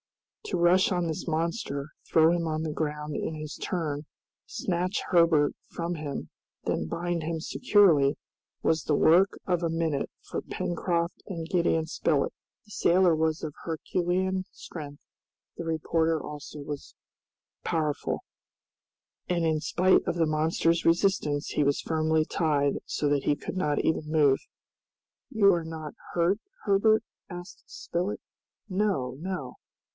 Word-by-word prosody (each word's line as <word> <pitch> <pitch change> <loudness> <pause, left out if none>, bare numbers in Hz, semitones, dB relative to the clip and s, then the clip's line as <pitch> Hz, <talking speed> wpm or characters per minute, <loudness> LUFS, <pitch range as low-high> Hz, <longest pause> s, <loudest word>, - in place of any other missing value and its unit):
To - - -1
rush 175 +3 +4
on 175 -2 +1
this 160 +2 -4
monster, 160 -3 -2 0.2
throw 160 0 +6
him 170 -1 0
on 155 0 -1
the 155 -2 -2
ground 150 -1 -3
in 160 - -2
his 155 -1 -6
turn, 155 -4 -3 0.4
snatch 180 +2 -1
Herbert 165 -4 +4 0.2
from 170 +1 -3
him, 150 -3 -5 0.4
then 80 - -1
bind 175 - -2
him 160 +1 -2
securely, 160 - +4 0.5
was 160 -2 +2
the 150 - +1
work 175 +7 +4
of 180 -2 +1
a 170 - 0
minute 160 -3 -1
for - - -4
Pencroft 170 0 -2
and 165 -5 -5
Gideon 170 -2 +2
Spilett. 155 -2 0 0.3
The 210 - -18
sailor 180 -3 +4
was 160 0 0
of 155 -2 -4
Herculean 180 +3 -1
strength, 145 -3 -9 0.5
the - - -5
reporter 160 0 +1
also 150 0 -8
very 145 0 -3 0.9
powerful, 155 -3 -1 1.1
and 170 -2 +1
in 160 -1 +2
spite 185 +3 +3
of - - 0
the 165 -1 +3
monster's 160 +2 +1
resistance 165 -4 +2
he 150 - +1
was 140 0 +2
firmly 160 -1 +1
tied 145 -4 +1
so 150 - -1
that 145 -1 +1
he 145 - +3
could 145 - -6
not 150 -6 +1
even 155 -1 0
move. 145 -4 +4 0.9
"You 205 -6 +5
are 170 -1 0
not 160 -2 -6 0.2
hurt, 175 +4 +2 0.2
Herbert?" 215 +2 +4 0.3
asked 175 -1 -9
Spilett. 180 +4 -3 0.5
"No, 185 - 0
no!" 180 -6 -5
165 Hz, 140 wpm, -28 LUFS, 150-175 Hz, 1.1 s, throw